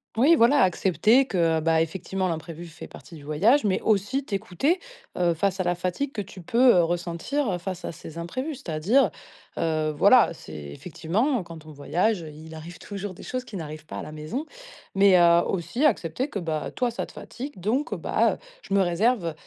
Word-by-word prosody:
Oui 280 +9 +5
voilà 275 +3 +5
accepter 200 +7 +3
que, 195 -8 -4 0.2
heu, - - +1
bah 160 0 +3
effectivement 185 +3 -2
l'imprévu 165 +1 -6
fait 165 - -10
partie 170 - -13
du 150 - -12
voyage, 200 - +3
mais 200 -3 +1
aussi 220 +6 +1
t'écouter, 210 - -1 0.4
heu, 175 -1 +2
face 190 +3 -1
à - - +2
la 175 0 +1
fatigue 185 +11 -3
que 210 - -3
tu 195 0 -11
peux, 240 +6 +5
heu, 175 - +5
ressentir, 175 - -1
heu, 180 - -1
face 185 0 -6
à - - -4
ces 165 0 -10
imprévus. 255 - -4
C'est-à-dire, 210 - +2 0.5
heu, 155 -1 0
voilà, 220 - +6
c'est - - -12
effectivement 170 - -2
quand 165 -2 -11
on 155 - -11
voyage, 175 +7 0
heu, 160 - -8
il 155 +2 -11
arrive 160 +2 -9
toujours 200 -2 -6
des - - -12
choses 255 0 -4
qui 215 -5 -8
n'arrivent 155 -1 -8
pas - - -7
à - - -4
la 155 - -8
maison. 155 - -5 0.5
Mais 195 -1 +6
heu, 170 -1 +6
aussi 195 - -2
accepter 250 - +1
que 205 - -5
bah, 160 -4 -3
toi 250 -2 -1
ça 230 - -4
te - - -14
fatigue, 265 -5 -8
donc 245 - -1
heu, - - -2
bah, - - +1
heu: - - -7 0.2
«Je 195 - -2
me 200 - +5
réserve, 180 0 +1
185 Hz, 205 wpm, -25 LUFS, 165-235 Hz, 0.5 s, voilà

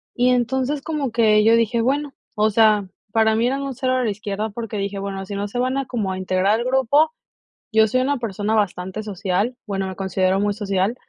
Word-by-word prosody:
Y, 245 +1 +3
entonces, 260 +3 0
como 295 -5 -3
que 215 -2 +4
yo 225 +1 +5
dije, 230 0 +1
bueno, 280 +3 0 0.2
o 215 +1 +2
sea, 210 -2 +4 0.2
para 220 0 +3
mí 230 +2 +1
eran 270 +2 -1
un 275 -2 -4
0 255 0 0
a 255 - +1
la 225 - 0
izquierda, 210 +1 -3
porque 225 0 -6
dije: 200 0 -3
"Bueno, 195 -1 -5
si 200 +1 -6
no 200 +1 -2
se 205 - -6
van 255 +2 0
a 275 - -1
como 220 -7 -2
a 185 - -3
integrar 185 +3 +1
al 240 - -3
grupo" 265 +4 +3 0.6
yo 220 0 +5
soy 255 +4 +1
una 285 +1 0
persona 215 -2 -2
bastante 190 -1 -1
social, 200 +3 -2
bueno, 195 -1 -2
me 190 - -7
considero 190 0 0
muy 205 0 0
social, 200 0 -1
220 Hz, 220 wpm, -21 LUFS, 200-250 Hz, 0.6 s, yo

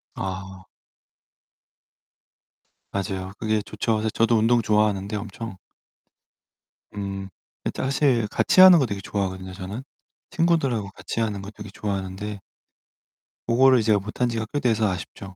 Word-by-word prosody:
아. 95 0 -6 2.2
맞아요. 95 -1 -3
그게 110 -1 0
좋죠. 110 +2 -1
사실 110 0 -1
저도 115 +1 +3
운동 115 +2 +3
좋아하는데 105 -1 +1
엄청 105 0 -7 1.4
음 95 -1 -4 0.4
이 - - 0
사실 130 -4 +1
같이 185 - +4
하는 185 -3 +10
거 135 - +3
되게 100 -4 -4
좋아하거든요, 95 -2 -3
저는. 100 +6 -6 0.5
친구들하고 160 - +1
같이 115 - -5
하는 105 -3 -1
거 100 +2 -8
되게 105 -1 -10
좋아하는데 100 +1 -4 1.1
고거를 130 +2 +5
이 - - 0
제가 105 -1 +3
못 105 +2 -9
한 125 - +4
지가 115 -1 -2
꽤 145 - 0
돼서 110 -4 +2
아쉽죠. 95 +2 -7
105 Hz, 285 characters per minute, -24 LUFS, 95-115 Hz, 2.2 s, 하는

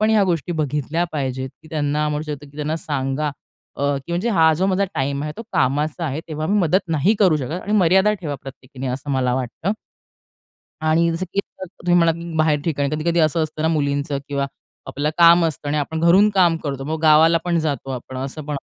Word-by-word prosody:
पण 215 +1 +3
ह्या 210 -3 +4
गोष्टी 165 +2 -3
बघितल्या 150 +1 -1
पाहिजेत, 130 -2 -3
की 155 - -15
त्यांना 150 0 0
म्हणू 150 0 -2
शकतो, 145 0 -8
की 145 - -18
त्यांना 150 +1 -2
सांगा 145 -1 -2 0.5
अ, - - -4 0.2
की 170 - -5
म्हणजे 180 +7 0
हा 160 -5 +5
जो 185 +5 0
माझा 195 +1 +2
टाईम 140 +1 -1
आहे 150 0 -4
तो 230 - -6
कामाचा 150 +2 0
आहे. 145 +3 -3
तेव्हा 155 0 -3
मी 205 +2 +2
मदत 185 +2 +3
नाही 165 +6 +2
करू 185 -7 +4
शकत 150 +6 -4
आणि 210 - -3
मर्यादा 190 +3 +4
ठेवा 150 -4 -3
प्रत्येकीने, 135 0 -9
असं 130 +3 -4
मला 125 -2 +1
वाटतं. 130 - -2 1.1
आणि 165 +2 +3
जसं 175 +3 -2
की 200 - +3 0.2
तुम्ही 175 -1 -2
म्हणालात, 165 -1 +3
की 170 -1 -7
बाहेर 155 -2 +2
ठिकाणी 145 -4 0
कधी-कधी 170 +2 +1
असं 155 +1 +2
असतं 155 0 -4
ना 160 - +2
मुलींचं 145 -2 0
किंवा 140 -1 -1 0.4
आपलं 145 +2 -2
काम 170 0 +7
असतं 150 -2 -2
आणि 150 - 0
आपण 160 +2 -2
घरून 180 +5 +5
काम 180 -4 +3
करतो. 135 -2 -3
मग 155 +2 -3
गावाला 160 +2 +6
पण 170 -1 +1
जातो 145 -3 -2
आपण 130 0 -6
असं 135 +4 -5
पण 150 -1 -3
155 Hz, 210 wpm, -21 LUFS, 140-170 Hz, 1.1 s, काम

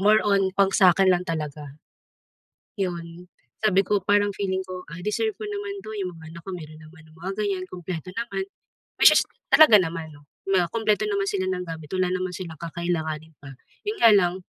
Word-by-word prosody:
more 210 +2 +5
on 195 -2 +3
pang 195 -1 +4
sakin 190 0 +5
lang 180 0 +2
talaga. 150 -3 -5 1.0
Yon, 175 -1 -4 0.4
sabi 195 -2 +4
ko 205 - +2
parang 205 +1 +3
feeling 190 -1 -2
ko 185 -1 -7
ay 165 - -7
deserve 435 - 0
ko - - -8
naman 405 -1 -4
'to, - - -7
'yong 190 -3 -3
mga 160 -1 -12
anak 170 - -10
ko - - -5
meron 155 -2 -10
naman 160 0 -15
ng 155 - -20
mga 185 +3 -5
ganyan 195 -3 -1
kumpleto 180 -1 -6
naman, 235 +11 -3 0.6
which - - +10
is - - +5 0.3
talaga 310 -8 +8
naman 165 -2 -4
'no 145 0 -17 0.3
na 185 -2 +3
kumpleto 215 -3 +1
naman 200 -1 0
sila 190 -2 -1
ng 180 -1 -2
gamit, 160 -2 -7
wala 185 -1 +1
naman 185 0 -2
silang 170 -4 -7
kakailanganin 160 -2 -3
pa, 140 - -10 0.4
'yon 425 +1 -2
nga 230 - +8
lang, 180 -3 +3
185 Hz, 195 wpm, -24 LUFS, 165-200 Hz, 1.0 s, which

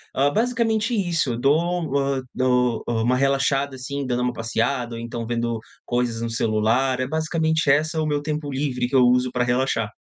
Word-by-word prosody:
Hã, 140 +2 +3
basicamente 230 -1 +1
isso. 170 - 0
Eu 115 - -4
dou, 160 +2 +1
hã 135 -1 0
dou, 125 -2 +1
hã, 115 -1 0
uma 125 +2 +2
relaxada 135 0 +1
assim 140 +2 -4
dando 125 -1 0
uma 125 0 0
passeada 120 +2 -1
ou 115 - -6
então 115 0 -5
vendo 115 0 -1 0.3
coisas 120 -2 -1
no 115 - -2
celular. 115 +4 +1
É 130 - -1
basicamente 160 0 0
esse 155 +3 +1
o - - 0
meu 145 -1 0
tempo 150 -1 -3
livre 130 -3 -1
que 130 - -3
eu 130 - +6
uso 125 0 +2
pra 125 -1 0
relaxar. 120 -3 0
130 Hz, 190 wpm, -23 LUFS, 120-150 Hz, 0.3 s, eu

